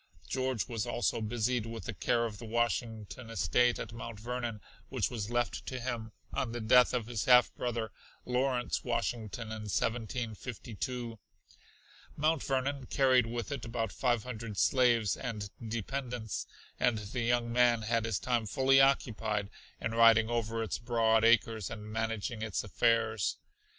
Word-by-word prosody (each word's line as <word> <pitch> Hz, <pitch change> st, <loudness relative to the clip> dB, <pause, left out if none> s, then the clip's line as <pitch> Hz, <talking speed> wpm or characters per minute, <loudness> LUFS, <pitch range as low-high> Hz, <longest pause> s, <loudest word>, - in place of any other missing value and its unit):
George 130 Hz, -3 st, -1 dB
was 115 Hz, -2 st, -3 dB
also 120 Hz, -1 st, 0 dB
busied 115 Hz, +1 st, 0 dB
with 115 Hz, 0 st, -6 dB
the 115 Hz, -, -4 dB
care 115 Hz, +5 st, +1 dB
of 105 Hz, -3 st, -6 dB
the -, -, -7 dB
Washington 115 Hz, 0 st, -2 dB
estate 120 Hz, +3 st, +2 dB
at -, -, -6 dB
Mount 115 Hz, -1 st, -7 dB
Vernon, 120 Hz, -1 st, -3 dB, 0.3 s
which -, -, -1 dB
was 110 Hz, -3 st, -3 dB
left 120 Hz, 0 st, -1 dB
to 130 Hz, -, -3 dB
him 115 Hz, -3 st, -4 dB, 0.2 s
on 115 Hz, -3 st, -1 dB
the 120 Hz, -, -3 dB
death 125 Hz, +3 st, +5 dB
of 125 Hz, -3 st, -1 dB
his 115 Hz, -3 st, -3 dB
half 125 Hz, -1 st, +6 dB
brother, 115 Hz, -3 st, -3 dB, 0.3 s
Lawrence 125 Hz, 0 st, 0 dB
Washington 115 Hz, -2 st, -2 dB
in 105 Hz, -1 st, -5 dB
1752. 115 Hz, +1 st, -3 dB, 1.0 s
Mount 155 Hz, 0 st, +2 dB
Vernon 135 Hz, 0 st, -1 dB
carried 130 Hz, -3 st, +4 dB
with 120 Hz, +4 st, -4 dB
it 140 Hz, -4 st, -4 dB
about 115 Hz, -3 st, -2 dB
five 120 Hz, -4 st, +1 dB
hundred 115 Hz, -4 st, -6 dB
slaves 120 Hz, -5 st, +3 dB
and 105 Hz, -5 st, -5 dB, 0.2 s
dependents, 120 Hz, 0 st, -3 dB, 0.3 s
and 125 Hz, -3 st, +3 dB
the 110 Hz, +4 st, -4 dB
young 120 Hz, 0 st, +1 dB
man 120 Hz, -2 st, +4 dB
had 115 Hz, +1 st, +1 dB
his 115 Hz, -, 0 dB
time 120 Hz, -3 st, 0 dB
fully 135 Hz, +2 st, +4 dB
occupied 110 Hz, -6 st, +1 dB, 0.3 s
in 115 Hz, -, -2 dB
riding 115 Hz, 0 st, +6 dB
over 115 Hz, -1 st, -1 dB
its 110 Hz, -, -3 dB
broad 115 Hz, -2 st, +2 dB
acres 115 Hz, -2 st, +3 dB
and 105 Hz, -2 st, -7 dB
managing 110 Hz, 0 st, -2 dB
its 110 Hz, -3 st, -2 dB
affairs. 110 Hz, 0 st, +1 dB
115 Hz, 150 wpm, -32 LUFS, 110-125 Hz, 1.0 s, half